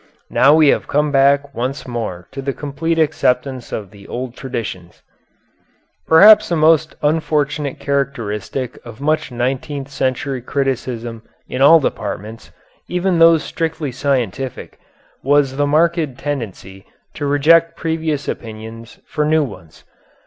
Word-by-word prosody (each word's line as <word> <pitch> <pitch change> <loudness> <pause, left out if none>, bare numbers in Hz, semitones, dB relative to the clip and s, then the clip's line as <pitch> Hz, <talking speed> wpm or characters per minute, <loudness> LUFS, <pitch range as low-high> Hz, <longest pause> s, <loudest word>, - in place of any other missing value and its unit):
Now 140 +4 +5
we 155 -2 +5
have - - +1
come 150 +1 +1
back 140 0 +3
once 130 +4 -4
more 110 -8 -5
to 135 - -6
the 135 0 -2
complete 155 +4 -3
acceptance 130 -4 0
of 100 -3 -5
the 100 -2 -15
old 125 0 -5
traditions. 110 -10 -6 1.0
Perhaps 205 +7 +7
the 170 - +1
most 155 0 +3
unfortunate 150 -2 0
characteristic 130 -3 -3
of 120 -1 -11
much 155 0 0
nineteenth 135 +3 -3
century 130 -1 -2
criticism 120 -3 -3 0.3
in 125 - -4
all 160 +4 +8
departments, 110 -4 -5 0.4
even 180 -1 0
those 165 -1 +6
strictly 160 -4 -3
scientific, 130 -2 -3 0.4
was 140 -1 +2
the 145 0 +1
marked 155 -2 +1
tendency 105 -9 -6 0.3
to 145 - -4
reject 165 +4 +4
previous 160 -3 -2
opinions 110 0 -7
for 150 - -2
new 155 +1 +2
ones. 90 - -10
140 Hz, 125 wpm, -18 LUFS, 120-155 Hz, 1.0 s, all